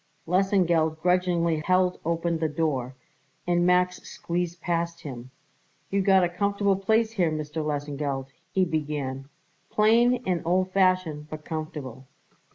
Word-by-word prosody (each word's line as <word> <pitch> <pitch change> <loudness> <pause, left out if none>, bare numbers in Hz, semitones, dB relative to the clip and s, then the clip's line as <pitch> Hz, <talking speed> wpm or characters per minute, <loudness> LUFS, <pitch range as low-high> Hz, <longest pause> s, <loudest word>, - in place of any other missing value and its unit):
Lesengeld 175 -4 +2
grudgingly 175 -2 +1
held 185 +3 +1
open 170 0 -1
the 160 -1 0
door, 145 -5 -2 0.5
and 175 0 +2
Max 180 0 +2
squeezed 175 0 -4
past 170 0 -2
him. 130 -5 -8 0.6
"You 200 0 +2
got 190 -1 +4
a - - +3
comfortable 200 +2 +1
place 220 +4 +1
here, 185 -7 +1
Mr. 155 0 -3
Lesengeld," 145 -2 -3 0.3
he 190 -1 +2
began, 145 -4 -3 0.4
"plain 235 +3 +3
and 180 -2 0
old 185 +2 +1
fashioned, 185 -6 +1
but 155 0 -8
comfortable." 150 -5 -6
170 Hz, 130 wpm, -26 LUFS, 155-185 Hz, 0.6 s, got